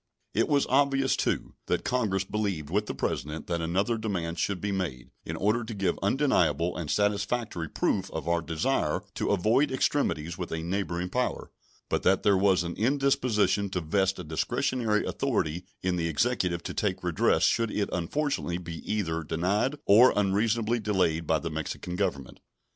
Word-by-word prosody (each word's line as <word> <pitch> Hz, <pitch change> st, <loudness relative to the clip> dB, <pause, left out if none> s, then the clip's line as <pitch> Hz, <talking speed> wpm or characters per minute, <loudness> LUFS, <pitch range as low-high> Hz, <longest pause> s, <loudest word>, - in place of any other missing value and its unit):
It -, -, +2 dB
was 145 Hz, -2 st, +3 dB
obvious, 135 Hz, 0 st, +2 dB
too, -, -, -1 dB
that -, -, 0 dB
Congress 105 Hz, -7 st, 0 dB
believed 95 Hz, -7 st, -3 dB
with 105 Hz, +2 st, 0 dB
the -, -, -4 dB
President 75 Hz, +1 st, -3 dB
that 85 Hz, -1 st, -2 dB
another 95 Hz, +8 st, 0 dB
demand 85 Hz, -6 st, -3 dB
should 100 Hz, -2 st, 0 dB
be 100 Hz, +2 st, -2 dB
made, 85 Hz, -10 st, -3 dB
in -, -, -4 dB
order 105 Hz, +4 st, +1 dB
to 115 Hz, -1 st, -6 dB
give 95 Hz, -2 st, 0 dB
undeniable 90 Hz, -, +2 dB
and 85 Hz, -4 st, -4 dB
satisfactory 105 Hz, -3 st, 0 dB
proof 95 Hz, -1 st, 0 dB
of 80 Hz, -1 st, -5 dB
our 85 Hz, 0 st, +2 dB
desire 80 Hz, -, 0 dB
to -, -, -2 dB
avoid 110 Hz, +9 st, +3 dB
extremities 85 Hz, -, 0 dB
with 90 Hz, -, -4 dB
a 80 Hz, 0 st, -3 dB
neighboring 90 Hz, -1 st, -2 dB
power, 125 Hz, +5 st, -2 dB, 0.4 s
but -, -, 0 dB
that 95 Hz, 0 st, +3 dB
there 100 Hz, -2 st, +5 dB
was 95 Hz, -2 st, +3 dB
an 85 Hz, 0 st, -4 dB
indisposition 120 Hz, -5 st, +2 dB
to 95 Hz, -, -2 dB
vest 95 Hz, +4 st, +1 dB
a -, -, -6 dB
discretionary 105 Hz, +8 st, 0 dB
authority 85 Hz, +4 st, -1 dB, 0.2 s
in 90 Hz, -1 st, 0 dB
the 85 Hz, -1 st, 0 dB
Executive 85 Hz, 0 st, 0 dB
to -, -, -5 dB
take -, -, -1 dB
redress -, -, +2 dB
should 115 Hz, -1 st, +3 dB
it 105 Hz, -1 st, -1 dB
unfortunately 90 Hz, -, -1 dB
be 85 Hz, -2 st, -7 dB
either 85 Hz, -6 st, -1 dB
denied 95 Hz, -, 0 dB
or 115 Hz, +6 st, +7 dB
unreasonably 110 Hz, +3 st, +1 dB
delayed 90 Hz, -7 st, 0 dB
by 80 Hz, -, +3 dB
the 85 Hz, +1 st, -4 dB
Mexican 80 Hz, +3 st, -4 dB
Government. 90 Hz, -9 st, -2 dB
95 Hz, 170 wpm, -28 LUFS, 85-110 Hz, 0.4 s, or